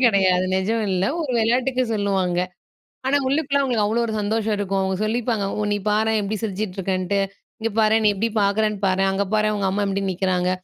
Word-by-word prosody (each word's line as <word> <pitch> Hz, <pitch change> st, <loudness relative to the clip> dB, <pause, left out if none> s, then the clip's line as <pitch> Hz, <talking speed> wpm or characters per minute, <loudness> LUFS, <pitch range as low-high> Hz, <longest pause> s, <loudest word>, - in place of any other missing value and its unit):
கிடையாது, 190 Hz, -5 st, +4 dB
நெஜம் 215 Hz, +4 st, 0 dB
இல்ல 185 Hz, 0 st, +1 dB, 0.2 s
ஒரு 300 Hz, -, -3 dB
வெளயாட்டுக்கு 250 Hz, +3 st, +1 dB
சொல்லுவாங்க. 195 Hz, -4 st, 0 dB, 0.7 s
ஆனா 280 Hz, +2 st, +3 dB
உள்ளுக்குள்ள 280 Hz, 0 st, +1 dB
அவுங்களுக்கு 240 Hz, -6 st, +1 dB
அவ்ளோ 225 Hz, +3 st, +1 dB
ஒரு 220 Hz, -, -3 dB
சந்தோஷம் 215 Hz, +1 st, 0 dB
இருக்கும். 195 Hz, -1 st, -1 dB
அவுங்க 190 Hz, 0 st, -1 dB
சொல்லிப்பாங்க. 225 Hz, -2 st, -1 dB
ஒ -, -, 0 dB
நீ 205 Hz, -, +1 dB
பாரேன் 220 Hz, +1 st, +2 dB
எப்டி 205 Hz, +2 st, -2 dB
சிரிச்சிட்டு 200 Hz, -2 st, -3 dB
இருக்கன்ட்டு, 190 Hz, +1 st, -1 dB, 0.4 s
"இங்க 225 Hz, -, -1 dB
பாரேன் 220 Hz, 0 st, +3 dB
நீ 210 Hz, -, +6 dB
எப்டி 225 Hz, +4 st, 0 dB
பாக்குறன்னு 210 Hz, +1 st, +1 dB
பாரேன். 195 Hz, +1 st, +2 dB
அங்க 195 Hz, +1 st, 0 dB
பாரேன் 215 Hz, 0 st, +2 dB
உங்க 195 Hz, -2 st, 0 dB
அம்மா 205 Hz, +2 st, 0 dB
எப்டி 195 Hz, 0 st, -1 dB
நிக்கிறாங்க." 180 Hz, -1 st, 0 dB
205 Hz, 185 wpm, -22 LUFS, 195-225 Hz, 0.7 s, நீ